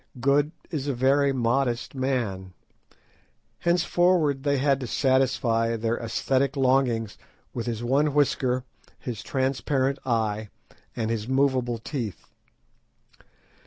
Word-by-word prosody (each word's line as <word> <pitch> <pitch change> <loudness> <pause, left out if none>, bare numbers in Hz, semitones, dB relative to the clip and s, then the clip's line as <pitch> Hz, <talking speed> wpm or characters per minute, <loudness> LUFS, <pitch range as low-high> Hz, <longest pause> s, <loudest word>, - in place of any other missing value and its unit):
Good 140 +4 +2 0.2
is 145 -4 -3
a 140 - -1
very 135 +3 +3
modest 120 -1 0
man. 120 -9 -2 1.1
Henceforward 175 -4 +2
they 140 0 +1
had 135 0 +2
to 130 - -5
satisfy 125 -3 +1
their 115 +1 -1
æsthetic 130 +4 0
longings 125 -5 +1 0.3
with 120 -1 -4
his 115 -1 -3
one 140 +5 +2
whisker, 130 -3 +1 0.3
his 120 -5 -6
transparent 135 0 0
eye, 110 -4 -1 0.5
and 115 -1 -1
his 110 -1 -2
movable 130 -3 +1
teeth. 115 - -5
130 Hz, 110 wpm, -26 LUFS, 115-140 Hz, 1.1 s, very